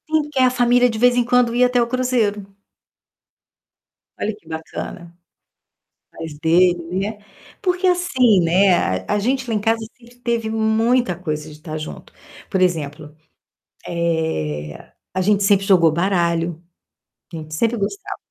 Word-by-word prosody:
Sim, 310 Hz, -1 st, +1 dB
que 275 Hz, -, -2 dB
a 255 Hz, -1 st, +5 dB
família 245 Hz, 0 st, +3 dB
de 225 Hz, -, -4 dB
vez 245 Hz, +1 st, +4 dB
em 245 Hz, -, +3 dB
quando 245 Hz, -1 st, +2 dB
ia 250 Hz, +1 st, +5 dB
até 250 Hz, 0 st, +1 dB
o -, -, +2 dB
Cruzeiro. 235 Hz, -5 st, 0 dB, 1.8 s
Olha 215 Hz, 0 st, -2 dB
que 205 Hz, -6 st, -24 dB
bacana. 165 Hz, +1 st, -7 dB, 1.0 s
Mas 160 Hz, -2 st, -8 dB
dele, 175 Hz, +2 st, +3 dB, 0.3 s
né. 215 Hz, -, -14 dB, 0.4 s
Porque 365 Hz, -1 st, 0 dB
assim, 260 Hz, -, +3 dB
né, 185 Hz, +3 st, +4 dB
a 95 Hz, -, -1 dB
a -, -, +1 dB
gente 255 Hz, +4 st, -1 dB
lá 225 Hz, -, 0 dB
em -, -, +1 dB
casa 225 Hz, +2 st, +1 dB, 0.2 s
sempre 240 Hz, 0 st, -19 dB
teve 235 Hz, -2 st, -1 dB
muita 225 Hz, 0 st, +1 dB
coisa 155 Hz, -3 st, -5 dB
de 150 Hz, 0 st, -14 dB
tá 155 Hz, -1 st, -6 dB
junto. 155 Hz, -, -9 dB, 0.4 s
Por 190 Hz, -, 0 dB
exemplo, 155 Hz, -4 st, -1 dB, 0.7 s
eh, 160 Hz, -, -3 dB, 0.2 s
a 190 Hz, -, 0 dB
gente 200 Hz, +2 st, +2 dB
sempre 195 Hz, 0 st, +3 dB
jogou 175 Hz, -5 st, +5 dB
baralho, 170 Hz, -2 st, 0 dB, 0.7 s
a -, -, -6 dB
gente 155 Hz, -1 st, -8 dB
sempre 230 Hz, +8 st, +1 dB
gostava. 390 Hz, -, -4 dB
200 Hz, 150 wpm, -20 LUFS, 165-245 Hz, 1.8 s, a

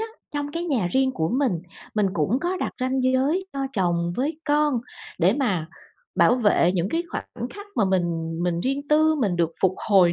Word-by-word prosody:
á, 445 Hz, -, -2 dB, 0.3 s
trong 290 Hz, 0 st, -3 dB
cái 335 Hz, +1 st, -3 dB
nhà 255 Hz, -, 0 dB
riêng 265 Hz, 0 st, +2 dB
của 160 Hz, -8 st, -1 dB
mình, 260 Hz, 0 st, +1 dB, 0.4 s
mình 210 Hz, -2 st, +2 dB
cũng 185 Hz, -, +1 dB
có 355 Hz, +3 st, -1 dB
đặt -, -, -3 dB
ranh 260 Hz, +1 st, 0 dB
giới 270 Hz, +9 st, +2 dB
cho 275 Hz, -1 st, -2 dB
chồng 175 Hz, -4 st, 0 dB
với 295 Hz, +5 st, -1 dB
con 295 Hz, -4 st, +2 dB, 0.4 s
để -, -, +4 dB
mà 200 Hz, -, 0 dB, 0.5 s
bảo -, -, +5 dB
vệ 205 Hz, -7 st, +3 dB
những 180 Hz, 0 st, 0 dB
cái 330 Hz, +9 st, 0 dB
khoảnh 240 Hz, -, -5 dB
khắc 410 Hz, 0 st, -10 dB
mà -, -, +4 dB
mình 170 Hz, -3 st, -1 dB
mình 175 Hz, -1 st, 0 dB
riêng 275 Hz, +6 st, -2 dB
tư, 310 Hz, +1 st, +4 dB
mình 210 Hz, -, 0 dB
được 170 Hz, -1 st, +1 dB
phục 185 Hz, -1 st, +3 dB
hồi 185 Hz, -4 st, +6 dB
250 Hz, 200 wpm, -24 LUFS, 180-290 Hz, 0.5 s, hồi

